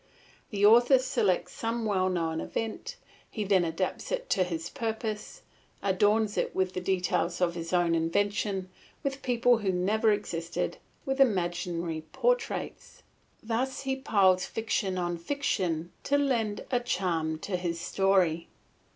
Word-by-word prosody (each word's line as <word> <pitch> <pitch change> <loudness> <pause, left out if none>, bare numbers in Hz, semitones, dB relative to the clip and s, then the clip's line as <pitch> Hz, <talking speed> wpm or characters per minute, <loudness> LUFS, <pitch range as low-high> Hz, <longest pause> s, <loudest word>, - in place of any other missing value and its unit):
The 205 -1 +2
author 240 +5 +7
selects 215 -7 0
some 230 0 -2
well 190 -3 +1
known 165 -3 -1
event, 225 - -4 0.3
he 215 - -3
then 190 -2 +3
adapts 170 +3 -2
it - - -3
to 185 - +3
his 170 -2 -4
purpose, 220 - -4 0.4
adorns 205 +2 +2
it - - -2
with 185 -1 0
details 180 -2 0
of 175 -1 +2
his 165 -1 -5
own 175 -2 +3
invention, 195 +3 0 0.3
with 275 0 -2
people 245 -1 +3
who 200 -3 0
never 210 +5 +2
existed, 170 -5 -2 0.3
with 270 0 0
imaginary 175 -6 0
portraits; - - -1 0.4
thus 240 +4 -1
he 270 -1 -1
piles 195 -8 +3
fiction 200 -4 -1
on 175 -1 -2
fiction 175 - -1
to 285 - +3
lend 235 -7 0
a 250 - +3
charm 175 -9 -1
to 185 +4 -4
his 175 -2 -2
story. 185 -4 +2
195 Hz, 135 wpm, -29 LUFS, 175-230 Hz, 0.4 s, author